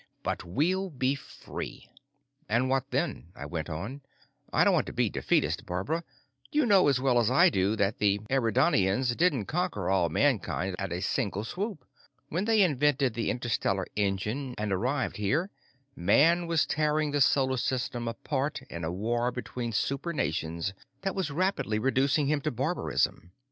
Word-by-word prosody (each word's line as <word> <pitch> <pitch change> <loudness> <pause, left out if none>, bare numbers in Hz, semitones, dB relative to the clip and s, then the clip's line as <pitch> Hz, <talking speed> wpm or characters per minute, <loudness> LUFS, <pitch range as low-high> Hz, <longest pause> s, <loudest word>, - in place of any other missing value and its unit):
But - - -2
we'll 175 - 0
be 130 -3 0
free." 140 - -8 0.6
"And 125 +4 +2
what 135 0 0
then?" 135 - -2
I 70 - -7
went 80 +1 -4
on. 100 - -5 0.5
"I - - +4
don't - - +4
want - - +1
to - - -6
be - - +1
defeatist, - - 0
Barbara, 95 - -1 0.5
but 135 - -19
you 300 -2 +4
know 200 -7 +5
as 135 -3 +3
well 130 -2 +3
as 115 -1 +2
I 130 - +5
do 100 +2 +1
that 100 -1 0
the 100 -1 +3
Eridanians 120 - +2
didn't 145 - +2
conquer 155 - -1
all 90 -3 +2
mankind 95 - 0
at 100 -3 -3
a 90 +1 -2
single 105 -3 -1
swoop. 185 - -4 0.4
When 175 +6 -1
they 220 -2 +4
invented 145 -5 +2
the 115 0 -1
interstellar 110 -5 -1
engine 105 +6 -1
and 105 -2 -1
arrived 130 +8 -1
here, 145 - 0 0.4
man 165 - +4
was 165 -2 +2
tearing 150 -1 +1
the 145 0 +1
Solar 130 -1 +3
System 120 -1 -2
apart 140 +5 -2
in 85 0 -5
a 80 - -1
war 120 +6 0
between 120 -1 -4
super 140 +9 -1
nations 85 - -2 0.3
that 195 0 -1
was 190 -6 -2
rapidly 165 - 0
reducing 135 +5 +2
him 145 +1 +1
to 155 - -1
barbarism. 130 - -1
130 Hz, 165 wpm, -29 LUFS, 100-150 Hz, 0.6 s, know